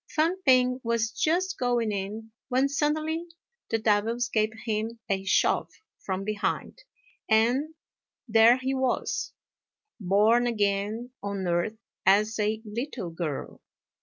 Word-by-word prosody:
Fang 325 +4 +1
p'ing 255 -2 +4
was 230 -1 0
just 355 - 0
going 240 -3 +1
in, 210 +3 -5 0.2
when 260 +2 +3
suddenly 310 +4 -1 0.4
the 225 - +1
devils 225 +2 +1
gave 215 -2 +2 0.2
him 220 +1 -2
a 195 -2 -1
shove - - +2 0.3
from 190 0 -3
behind, 215 - -2 0.5
and... 245 +8 +2 0.5
there 225 +2 +6
he 260 +1 -2
was, 260 -1 -1 0.7
born 215 +5 +3
again 210 +2 -1
on 200 -2 -3
earth 175 +6 0 0.3
as 210 +3 +3
a 215 +1 0
little 225 - -5
girl. 165 -4 -5
225 Hz, 120 wpm, -27 LUFS, 205-255 Hz, 0.7 s, there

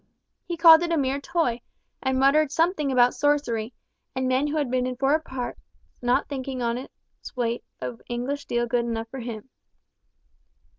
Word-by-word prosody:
He 345 - -3
called 325 -1 +9
it 345 -1 -1
a 335 - +2
mere 275 0 0
toy, 260 -7 0 0.4
and 265 -1 0
muttered 275 +2 +4
something 320 -3 +1
about 250 -1 +4
sorcery, 270 -6 0 0.4
and 260 0 0
men 260 +3 +2
who 300 +1 -2
had 285 -5 -1
been 255 0 +1
in 255 - -3
foreign 275 +5 +2
parts 260 -5 -6 0.4
not 245 0 +1
thinking 265 -2 -4
honest 240 +2 -2 0.5
weight 235 -1 -1 0.2
of 125 -1 -6
English 250 +4 -2
steel 240 -3 -1
good 240 0 0
enough 225 -1 -3
for 260 0 -7
them. 230 0 -7
260 Hz, 165 wpm, -25 LUFS, 240-290 Hz, 0.5 s, called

